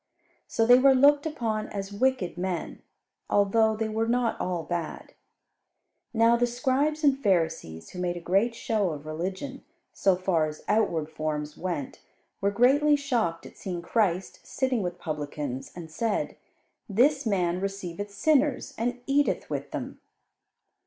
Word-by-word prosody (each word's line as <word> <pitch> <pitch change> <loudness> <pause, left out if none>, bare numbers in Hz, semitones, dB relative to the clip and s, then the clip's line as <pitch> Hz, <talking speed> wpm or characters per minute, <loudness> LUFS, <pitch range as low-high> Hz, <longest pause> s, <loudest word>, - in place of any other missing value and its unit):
So 225 - +1
they 245 +2 +7
were 270 0 +6
looked 285 +3 +5
upon 225 -8 -2
as 200 0 -5
wicked 250 -4 0
men, 180 0 -4 0.5
although 220 +2 +3
they 220 0 -1
were 220 +1 -1
not 240 0 0
all 180 -2 -2
bad. 170 0 -5 1.0
Now 230 0 +4
the 240 +1 +2
Scribes 270 +6 0
and 275 -2 +3
Pharisees, 160 - 0
who 180 - -8
made 175 -1 -1
a - - -4
great 195 +7 +1
show 215 -8 0
of 145 0 -9
religion, 185 - -5 0.3
so 195 -2 +3
far 180 -4 +1
as 155 0 -8
outward 200 -8 +1
forms 155 -1 -4
went, 175 -7 -4 0.4
were 200 - +3
greatly 275 +8 +4
shocked 240 -12 -1
at - - -12
seeing 175 -3 -4
Christ 190 -2 0
sitting 260 -4 -1
with 175 -1 -3
publicans, 145 -4 -5
and 165 -3 -9
said, 220 +7 -1 0.5
"This 265 +6 +3
man 180 -3 +1
receiveth 195 0 -4
sinners 280 +5 +1
and 245 +2 -1
eateth 285 +1 +1
with - - -3
them." - - -6
205 Hz, 145 wpm, -27 LUFS, 175-245 Hz, 1.0 s, they